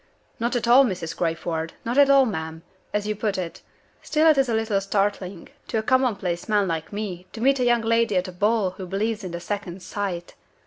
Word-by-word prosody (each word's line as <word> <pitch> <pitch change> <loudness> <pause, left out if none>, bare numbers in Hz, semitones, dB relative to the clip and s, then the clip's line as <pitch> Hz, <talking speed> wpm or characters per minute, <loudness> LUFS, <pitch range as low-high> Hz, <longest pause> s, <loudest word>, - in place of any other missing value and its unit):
"Not 235 +2 0
at 235 -1 0
all, 250 +3 +8
Mrs. 180 -8 -3
Crayford 165 -1 -2
not 235 +2 -1
at 280 0 +6
all, 275 -1 +6
ma'am, 160 -6 -4 0.3
as 210 0 -1
you 215 0 -1
put 210 -1 -1
it. 175 -3 -5 0.4
Still 310 +1 +1
it 300 - +1
is 265 -2 +2
a - - +1
little 220 -3 0
startling, 195 -2 -2 0.2
to 225 - -2
a 220 - 0
commonplace 220 -8 0
man 205 -2 +3
like 165 -2 -3
me, 195 -4 -5
to - - -7
meet 270 +3 +3
a 250 - +2
young 240 -1 +3
lady 230 -3 +2
at 180 +1 0
a - - -6
ball 205 +1 +1
who 185 0 -8
believes 215 +3 -2
in 185 - -4
the 170 0 -5
Second 190 -1 -5
Sight. 185 -4 -4
205 Hz, 220 wpm, -24 LUFS, 180-230 Hz, 0.4 s, all